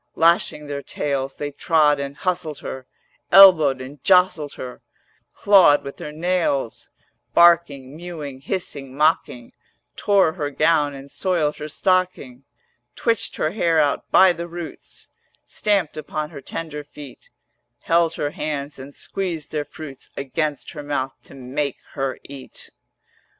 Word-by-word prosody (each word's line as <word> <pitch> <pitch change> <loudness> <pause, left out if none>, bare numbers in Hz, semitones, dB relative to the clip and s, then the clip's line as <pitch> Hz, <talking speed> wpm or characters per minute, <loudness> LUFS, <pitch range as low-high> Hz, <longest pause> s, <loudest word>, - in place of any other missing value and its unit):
Lashing 165 -2 +2
their 145 -1 -5
tails 135 -1 -3
They 145 0 -4
trod 150 -1 +2
and 140 0 -5
hustled 175 -5 -2
her, 130 -1 -7 0.4
Elbowed 160 -9 +8
and 135 +2 -10
jostled 180 -6 +3
her, 125 -1 -8 0.5
400 - - -52
Clawed 190 -8 +5
with 140 - -8
their 150 - -7
nails, 160 -6 -1 0.5
Barking, 155 -6 +4
mewing, 155 -6 -7
hissing, 140 -5 -5
mocking, 150 -6 +1 0.4
Tore 195 -6 +3
her 150 -5 -3
gown 150 -1 +2
and 135 +1 -11
soiled 170 -6 0
her 150 - -6
stocking, 155 -7 -1 0.5
Twitched 230 -1 0
her 155 - -1
hair 170 -5 +2
out 145 -2 0
by 190 -1 +6
the 170 +1 -6
roots, 170 -1 -9 0.4
Stamped 200 -7 0
upon 155 0 -4
her 140 -4 -9
tender 150 +1 -6
feet, 145 -2 -13 0.5
Held 165 -1 +2
her 145 - -2
hands 145 -2 -4
and 140 +2 -10
squeezed 175 -6 -4
their 150 -1 -2
fruits 145 -2 -10
Against 145 +1 -3
her 150 - -7
mouth 140 -2 -2
to - - -14
make 135 +2 -3 0.2
her 135 -1 -2
eat. 135 -2 -10
150 Hz, 140 wpm, -22 LUFS, 140-170 Hz, 0.5 s, Elbowed